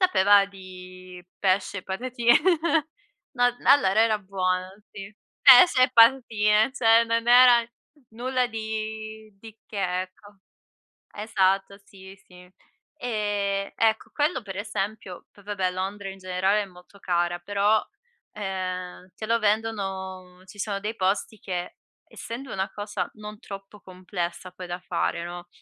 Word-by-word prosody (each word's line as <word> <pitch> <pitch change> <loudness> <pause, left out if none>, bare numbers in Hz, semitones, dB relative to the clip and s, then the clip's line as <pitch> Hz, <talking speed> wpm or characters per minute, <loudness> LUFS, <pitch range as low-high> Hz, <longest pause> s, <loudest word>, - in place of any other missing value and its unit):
Sapeva 205 - +5
di 185 -2 -12 0.2
pesce, 195 +1 0
e 185 - -9
patati 235 +5 -5 1.1
no, 245 -3 +3
n - - -14
allora 225 -7 +5
era 220 -1 +3
buono, 185 -2 -2 0.2
sì 195 +1 -10 0.3
pesce 255 0 +8
e - - -1
patatine, 230 -2 +4
cioè 230 -3 +4
non 230 0 -1
era 245 -1 +7 0.4
nulla 250 +2 -1
di 220 -1 -6
di 225 0 -13
che, 185 -3 -2
ecco. 200 +2 -15 0.8
Esatto, 195 -2 0
sì, 190 -1 -14
sì. 180 0 -17 0.5
E 205 -6 -2
ecco 220 -1 0
quello 300 0 0
per 195 -3 -9
esempio 205 -2 -5
poi 200 - -20
vabbè 190 -2 -2
Londra 195 +2 -5
in 195 0 -10
generale 190 +2 0
è - - -4
molto 180 +1 -18
cara, 175 -1 -1
però, 205 +4 +1 0.5
ehm, 185 -2 -5
te 215 - -6
lo 230 +1 +2
vendono 195 -4 -3
ci 195 +2 -15
sono 200 -1 -2
dei 215 +3 -4
posti 200 +2 -1
che, 180 -2 -5 0.3
essendo 240 +2 -8
una 190 0 -2
cosa 205 0 -4
non 210 0 -9
troppo 195 0 -11
complessa 180 -1 -6
poi 180 0 -9
da 175 0 -5
fare, 170 -1 -2
no, 175 0 -8
200 Hz, 135 wpm, -25 LUFS, 185-220 Hz, 1.1 s, pesce